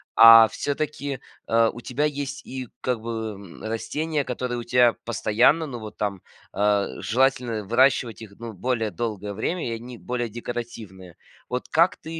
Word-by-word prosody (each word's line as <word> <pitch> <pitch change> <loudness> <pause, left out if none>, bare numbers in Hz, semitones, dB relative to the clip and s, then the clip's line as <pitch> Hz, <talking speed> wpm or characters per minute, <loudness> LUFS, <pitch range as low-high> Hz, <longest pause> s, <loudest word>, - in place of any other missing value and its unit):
А 115 0 +10
все-таки, 145 -1 -3 0.3
э, 115 0 +4
у 120 - -9
тебя 130 +5 -1
есть 140 -2 -4
и 130 -2 -6
как 125 -3 -1
бы, 110 -1 -4
м, 100 -3 -12
растения, 145 +8 -2
которые 125 -1 -3
у - - -5
тебя 120 -1 +4
постоянно, 120 +7 +3
ну, 125 -4 -6
вот 110 -1 -9
там, 100 -3 -2 0.3
э, 105 -1 +2
желательно 120 -2 +1
выращивать 120 0 +2
их, 110 - -10
ну, 115 -1 -7
более 115 +1 -1
долгое 105 -3 -4
время 170 - -2
и - - -3
они 120 +1 -9
более 120 0 -3
декоративные. 110 -6 -7 0.3
Вот 125 0 -3
как 170 +3 +3
ты 165 0 -7
120 Hz, 160 wpm, -24 LUFS, 110-130 Hz, 0.3 s, А